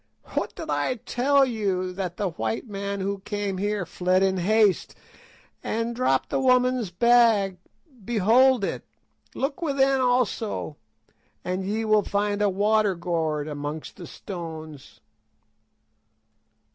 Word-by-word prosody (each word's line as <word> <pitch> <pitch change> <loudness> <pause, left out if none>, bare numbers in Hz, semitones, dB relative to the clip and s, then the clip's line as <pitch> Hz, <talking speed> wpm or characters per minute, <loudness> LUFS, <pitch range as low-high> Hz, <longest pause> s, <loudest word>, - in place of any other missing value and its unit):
"What - - -2
did - - -5
I 255 - 0
tell 270 +4 +2
you, 195 -6 -2
that 180 -2 -4
the 200 -3 -1
white 225 +8 -3
man 200 -1 -4
who 200 +1 -2
came 200 -1 -3
here 205 -1 -1
fled 185 +3 +1
in 190 -1 +1
haste, 205 +2 +2 0.7
and 230 +1 -2
dropped 230 - +1
the - - +1
woman's 255 -4 +2
bag—behold 230 - +2
it! - - -3 0.5
Look 275 +5 -2
within 275 -4 +2
also 245 -10 0 0.7
and 185 +1 -2
ye 215 +3 -2
will 215 -1 +4
find 205 +1 -1
a 205 - +3
water 205 +1 +2
gourd 160 -4 -2
amongst 150 +1 -6
the 175 -4 -9
stones." 160 -6 -9
205 Hz, 120 wpm, -25 LUFS, 185-235 Hz, 0.7 s, will